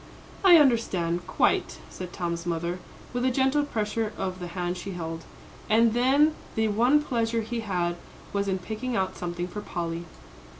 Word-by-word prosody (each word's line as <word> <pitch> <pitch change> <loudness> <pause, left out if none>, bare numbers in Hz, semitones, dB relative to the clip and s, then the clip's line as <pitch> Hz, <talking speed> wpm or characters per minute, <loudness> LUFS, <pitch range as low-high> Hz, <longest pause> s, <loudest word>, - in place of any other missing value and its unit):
"I 360 -3 +9
understand 185 - +2
quite," - - +1
said 180 -1 -7
Tom's 170 -2 -3
mother, 170 +1 -2 0.3
with 245 0 -1
a 260 - +4
gentle 265 +3 +2
pressure 220 -4 -2
of 185 -1 -3
the 175 - -5
hand 175 0 -1
she 190 +2 -6
held. 165 -2 -5 0.4
"And 225 +1 +5
then 275 +6 +4 0.2
the 220 -1 +2
one 245 +8 +4
pleasure 230 -3 0
he 230 +2 -3
had 175 -5 -1 0.4
was 200 0 0
in 190 -1 +1
picking 220 +6 -4
out 190 -1 0
something 175 0 -3
for 210 +3 -6
Polly." 170 -3 -4
205 Hz, 165 wpm, -27 LUFS, 175-235 Hz, 0.4 s, I